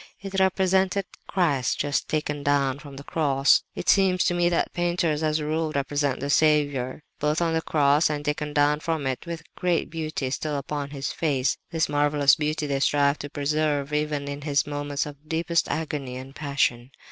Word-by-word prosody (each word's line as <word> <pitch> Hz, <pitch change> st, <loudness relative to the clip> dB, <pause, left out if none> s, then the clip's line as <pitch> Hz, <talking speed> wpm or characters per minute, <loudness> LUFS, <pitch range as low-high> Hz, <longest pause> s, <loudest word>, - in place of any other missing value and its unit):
It 195 Hz, 0 st, -3 dB
represented 190 Hz, 0 st, +2 dB, 0.2 s
Christ 145 Hz, -10 st, +1 dB
just 145 Hz, 0 st, -1 dB
taken 150 Hz, -2 st, -1 dB
down 140 Hz, -1 st, +1 dB
from 140 Hz, -1 st, -11 dB
the 140 Hz, -, -9 dB
cross. 140 Hz, -3 st, +3 dB
It -, -, -6 dB
seems 190 Hz, -2 st, +4 dB
to -, -, +2 dB
me 175 Hz, 0 st, +2 dB
that 170 Hz, -, 0 dB
painters 175 Hz, -3 st, 0 dB
as 155 Hz, -1 st, +1 dB
a 150 Hz, -, -3 dB
rule 155 Hz, +1 st, -1 dB
represent 140 Hz, -1 st, 0 dB
the 140 Hz, +1 st, -1 dB
Saviour, 145 Hz, -3 st, +2 dB, 0.2 s
both 150 Hz, +2 st, +1 dB
on 165 Hz, -1 st, +1 dB
the 160 Hz, -, +1 dB
cross 150 Hz, -1 st, +3 dB
and 145 Hz, -1 st, -3 dB
taken 150 Hz, 0 st, -2 dB
down 145 Hz, 0 st, +3 dB
from 160 Hz, -2 st, -2 dB
it, 130 Hz, +4 st, -3 dB
with 165 Hz, -1 st, -5 dB
great 175 Hz, -3 st, 0 dB
beauty 155 Hz, -5 st, -3 dB
still 150 Hz, +1 st, -2 dB
upon 140 Hz, 0 st, -4 dB
His 140 Hz, -1 st, -4 dB
face. 140 Hz, -5 st, 0 dB
This 160 Hz, -2 st, 0 dB
marvellous 145 Hz, -1 st, +3 dB
beauty 155 Hz, 0 st, -1 dB
they 140 Hz, -1 st, -1 dB
strive 140 Hz, +1 st, +2 dB
to 145 Hz, -, -6 dB
preserve 145 Hz, 0 st, -1 dB
even 150 Hz, -1 st, -1 dB
in 140 Hz, 0 st, -5 dB
His 145 Hz, -1 st, +1 dB
moments 145 Hz, 0 st, -2 dB
of 150 Hz, +1 st, -11 dB
deepest 165 Hz, +1 st, 0 dB
agony 145 Hz, -5 st, -3 dB
and 130 Hz, +1 st, -9 dB
passion. 135 Hz, -4 st, 0 dB
150 Hz, 185 wpm, -25 LUFS, 140-160 Hz, 0.2 s, seems